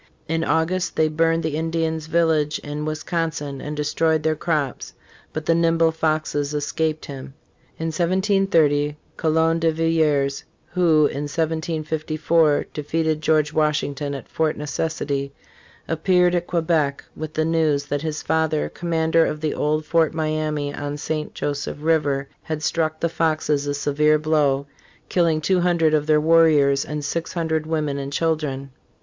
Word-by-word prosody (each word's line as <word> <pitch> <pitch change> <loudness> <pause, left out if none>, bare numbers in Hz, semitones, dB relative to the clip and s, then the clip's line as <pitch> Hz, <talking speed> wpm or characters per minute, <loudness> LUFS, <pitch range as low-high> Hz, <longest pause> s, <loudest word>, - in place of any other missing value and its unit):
In 165 +1 0
August, 175 +3 0
they 155 0 +3
burned 165 +1 +1
the 155 -2 -1
Indians' 160 0 -1
village 160 -2 +2
in 150 +1 -4
Wisconsin 155 -3 -3
and 150 0 -5
de 150 - 0
stroyed 160 +1 +1
their 155 0 +1
crops, 150 -4 -2 0.4
but 155 0 -5
the 165 - +3
nimble 165 -1 +3
Foxes 155 -2 -1
escaped 155 +1 -1
him. 135 -1 -9 0.4
In 165 0 -2
1730, 170 -5 +2 0.2
Coulon 160 +1 +2
de 165 0 +2
Villiers, 155 -4 +1 0.3
who 160 -4 +3
in 145 +1 -2
1754 160 0 0
defeated 155 +1 -1
George 155 -1 +2
Washington 150 -2 0
at 135 - -8
Fort 160 -1 -1
Necessity, 145 -2 -3 0.5
appeared 180 +2 +2
at 175 -1 -1
Quebec 160 -4 0
with 155 0 -6
the 155 - +1
news 155 -3 +1
that 145 -1 -2
his 155 -1 -4
father, 160 -1 0
com 175 - -7
mander 160 0 +3
of 150 - -2
the 155 -1 -1
old 155 +1 0
Fort 165 -1 +2
Miamis 155 -2 -1
on 145 0 -4
St. 155 +1 -4
Joseph 145 0 -3
river, 150 -3 +1
had 155 -1 -5
struck 155 -1 0
the 170 - +2
Foxes 155 -3 0
a 145 - -1
severe 150 +2 +2
blow, 150 -3 +1 0.4
killing 165 -3 +2
two 180 +4 +1
hundred 170 -3 +2
of 150 -1 +1
their 155 -1 +4
warriors 150 -3 +4
and 150 -1 -5
six 165 +3 -3
hundred 160 -2 -1
women 150 -3 -1
and 140 0 -5
children. 145 -4 -1
155 Hz, 150 wpm, -22 LUFS, 150-165 Hz, 0.5 s, their